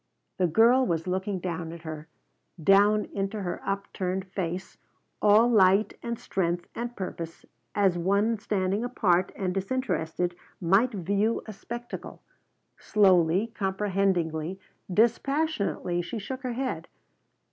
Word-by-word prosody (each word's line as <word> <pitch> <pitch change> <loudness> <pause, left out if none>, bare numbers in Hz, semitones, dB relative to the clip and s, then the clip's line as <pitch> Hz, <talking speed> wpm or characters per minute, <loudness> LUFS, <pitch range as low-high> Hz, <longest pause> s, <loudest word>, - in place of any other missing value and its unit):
The 180 - +4
girl 230 +9 +5
was 165 -8 -1
looking 190 +2 -1
down 170 -2 -4
at 170 -1 -10
her, 155 -1 -7 0.6
down 205 +3 +5
into 195 +2 -2
the 175 - -3
upturned 190 -1 -2
face, 185 -1 -5 0.4
all 215 +3 +6
light 200 -2 +4
and 235 0 -3
strength 175 -4 -2
and 240 +1 -5
purpose 170 -3 -6 0.3
as 190 -4 +3
one 200 +5 +2
standing 200 0 0
apart 190 -7 +2
and 185 -2 -2
disinterested 185 -5 -1 0.2
might 195 +9 +3
view 200 +3 0
a 215 - -7
spectacle. 240 +4 -8 0.6
Slowly, 190 +1 +3
comprehendingly, 190 -4 0 0.3
dispassionately 230 - +1
she 225 +7 -5
shook 260 +6 -5
her 250 -2 -3
head. 255 +1 -3
195 Hz, 120 wpm, -27 LUFS, 180-220 Hz, 0.6 s, all